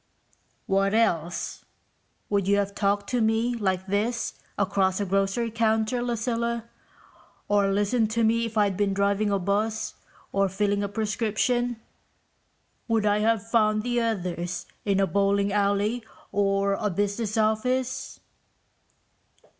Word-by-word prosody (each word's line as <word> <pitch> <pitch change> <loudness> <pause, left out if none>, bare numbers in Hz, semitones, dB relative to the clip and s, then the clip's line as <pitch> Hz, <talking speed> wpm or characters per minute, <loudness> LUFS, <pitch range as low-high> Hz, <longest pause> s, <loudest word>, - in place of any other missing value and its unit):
"What 195 +1 +2
else? 175 -7 0 0.7
Would 200 -2 +1
you 200 0 +4
have 200 0 -1
talked 200 0 0
to 245 -2 +1
me 225 +2 +2
like 190 -5 -1
this 210 +5 -1 0.2
across 195 -1 +1
a 205 - 0
grocery 195 +4 0
counter, 225 +1 +1
Lucilla? 235 -1 -2 0.8
Or 205 -1 +3
listened 205 +3 +1
to 230 +1 0
me, 230 +1 +2
if 225 0 -7
I'd 205 -2 +3
been 200 0 0
driving 200 +1 +1
a 200 - +2
bus 210 +4 -1 0.4
or 195 0 +2
filling 200 +1 0
a 200 - -2
prescription? 225 +3 0 1.1
Would 225 -2 +1
I 205 0 +3
have 225 0 +1
found 215 -2 +2
the 240 0 0
others 180 -6 -2 0.2
in 200 -2 +2
a 195 - +4
bowling 200 0 +1
alley 205 +3 +1 0.3
or 200 0 +1
a 210 +1 -1
business 205 +3 -1
office?" 250 +4 0
205 Hz, 130 wpm, -26 LUFS, 200-225 Hz, 1.1 s, you